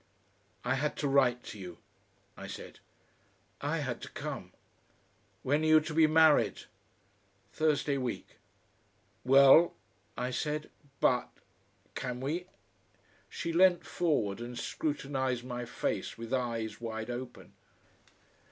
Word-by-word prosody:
"I 125 - +2
had 145 +3 -1
to 145 - -1
write 130 -3 +3
to 105 - -9
you," 90 -3 -8 0.6
I - - -8
said. - - -9 0.8
"I - - -1
had - - -4
to - - -7
come." - - -6 0.9
"When 145 +4 +2
are 155 - +1
you 155 0 +7
to 155 +1 -6
be 160 0 +5
married?" 160 -1 +4 0.9
"Thursday 145 -3 +1
week." 125 -3 -5 0.9
"Well?" 140 +6 +7 0.4
I 125 - -2
said. 150 +4 -3 0.3
"But 125 -1 +3 0.6
can 125 -1 -4
we?" 160 +7 -3 0.8
She 170 -1 -4
leant 180 0 +5
forward 120 - 0
and 120 0 -6
scrutinised 135 -5 -2
my 120 -1 -5
face - - -3
with 115 +2 -6
eyes 115 -4 -2
wide 110 0 -4
open. 125 0 -7
135 Hz, 120 wpm, -31 LUFS, 120-155 Hz, 0.9 s, you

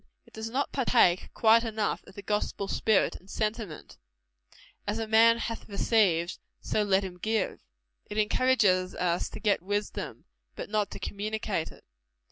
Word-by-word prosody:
It - - -22
does 220 +1 -5
not 270 +5 -1
partake 235 -9 +3
quite 230 +1 +5
enough 220 -2 -2
of 195 - -15
the 200 - -8
gospel 210 0 -2
spirit 215 +1 +2
and 185 - -21
sentiment 215 -6 -4 0.9
"As 205 +2 -1
a 225 - -2
man 225 +1 +5
hath 230 -1 -5
received, 195 -5 +2 0.2
so 215 - -1
let 200 -1 +2
him 180 -2 -7
give." 215 0 -1 0.5
It 210 - -5
encourages 210 -5 +2
us 175 -1 0
to - - -8
get 205 -5 +1
wisdom, 205 +3 -4 0.3
but - - -7
not 210 -1 +1
to - - -8
communicate 205 -4 -3
it. - - -17
210 Hz, 155 wpm, -28 LUFS, 190-225 Hz, 0.9 s, quite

